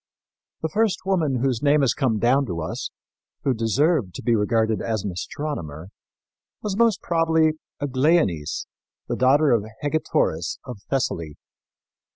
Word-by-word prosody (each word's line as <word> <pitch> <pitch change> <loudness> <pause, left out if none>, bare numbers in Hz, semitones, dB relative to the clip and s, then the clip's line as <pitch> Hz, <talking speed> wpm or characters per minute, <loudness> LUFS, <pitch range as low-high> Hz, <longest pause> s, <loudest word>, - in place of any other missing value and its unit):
The 160 - 0
first 215 +1 0
woman 155 -10 +1
whose 130 -4 +1
name 145 0 +4
has 135 -3 +3
come 125 -6 +1
down 130 +5 +3
to 85 -4 -3
us, 80 - -4 0.5
who 135 - +2
deserved 120 - +1
to - - -7
be 120 - +2
regarded 110 +1 +1
as 110 -3 -2
an 100 - -2
astronomer, 90 - -5 0.7
was 205 -2 -2
most 230 -2 +2
probably 160 -1 +3 0.3
Aglaonice, 135 - +1 0.4
the - - -1
daughter 140 +3 +4
of 115 -4 +3 0.2
Hegetoris 145 - 0
of 125 -6 -7
Thessaly. 85 - -1
130 Hz, 140 wpm, -23 LUFS, 110-155 Hz, 0.7 s, name